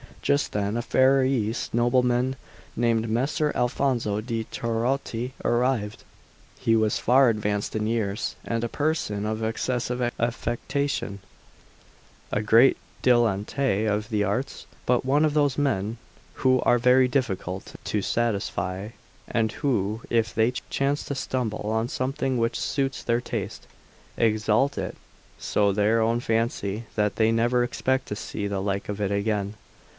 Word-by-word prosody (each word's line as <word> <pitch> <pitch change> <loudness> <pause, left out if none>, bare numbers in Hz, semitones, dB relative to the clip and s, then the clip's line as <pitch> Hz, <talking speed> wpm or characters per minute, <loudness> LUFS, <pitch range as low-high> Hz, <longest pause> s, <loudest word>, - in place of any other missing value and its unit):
Just 140 0 +1
then 105 +2 -1
a - - 0
Ferrarese 130 -3 +2
nobleman 125 +2 +2 0.4
named 115 -1 +1
Messer 140 +6 +1
Alfonso 120 -4 0
de' 115 -1 -3
Trotti 120 +2 -2
arrived. 120 -4 0 0.6
He 115 - +2
was 110 -1 +2
far 130 +1 +5
advanced 105 -2 -1
in 110 0 0
years, 110 -3 -1
and 115 0 -2
a 120 - -1
person 145 -10 -1
of 110 +1 -2
excessive 125 +2 -1 0.2
affectation; 120 -1 -2 1.1
a 105 - 0
great 115 +5 +5 0.3
dilettante 115 -1 +2
of 105 +1 -1
the 105 -3 +1
arts, 125 +5 -2 0.2
but 125 0 +2
one 145 +4 +3
of 150 - +1
those 145 -3 +2
men 115 -6 0 0.4
who 130 -1 +3
are 120 - +3
very 125 +1 +5
difficult 100 -8 -2
to 105 - 0
satisfy, 100 -3 -1 0.4
and 110 -2 0
who, 110 -6 -1
if 115 -1 +1
they 110 +2 +3 0.2
chance 140 +1 0
to 140 - -3
stumble 125 -5 -2
on 110 +1 0
something 130 0 -1
which 115 0 0
suits 135 -3 -1
their 120 0 +1
taste, - - -5 0.5
exalt 110 +4 +2
it 95 -2 -3 0.4
so 105 -1 +1
in 100 - 0
their 105 +2 +3
own 115 +1 +2
fancy 115 -2 -1
that 105 -1 0
they 110 0 +4
never 120 +2 +2
expect 130 +2 -1
to 105 - -3
see 105 -1 -4
the 100 -1 -2
like 100 0 -2
of 105 0 -3
it 100 -1 0
again. 100 0 -1
115 Hz, 140 wpm, -25 LUFS, 105-130 Hz, 1.1 s, far